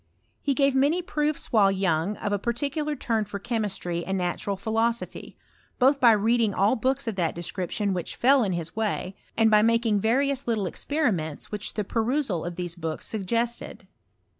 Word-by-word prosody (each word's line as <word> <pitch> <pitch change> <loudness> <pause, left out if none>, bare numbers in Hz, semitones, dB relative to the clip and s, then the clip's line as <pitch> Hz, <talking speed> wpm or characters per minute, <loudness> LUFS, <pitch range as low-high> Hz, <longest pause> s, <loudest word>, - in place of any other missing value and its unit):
He 280 -2 0
gave 275 -1 +3
many 290 +7 +2
proofs 300 -3 -1
while 205 -4 +5
young 190 0 0
of 205 - -3
a 205 - 0
particular 280 +7 -1
turn 225 -4 0
for 205 0 -6
chemistry 200 -6 -2
and 190 +2 -2
natural 185 +2 -2
philosophy, 225 +3 -2 0.4
both 275 +2 +4
by 235 -3 +7
reading 220 0 +2
all 200 +6 +3
books 260 +2 -1
of 225 - -2
that 170 -3 0
de 170 - -5
ACription 190 +3 -2
which 180 -2 -4
fell 265 +1 +4
in 195 -3 0
his 165 -1 -3
way, 210 -3 -2 0.2
and 220 -1 +4
by 210 0 +6
making 230 -1 +2
vari 265 +6 +2
ous 275 -1 -3
little 220 -4 0
experiments 185 - -2
which 210 -1 -4
the 210 - 0
perusal 225 - -1
of 175 0 -5
these 175 -1 -4
books 165 -2 -4
suggested. 230 +3 -3
220 Hz, 180 wpm, -26 LUFS, 190-250 Hz, 0.4 s, by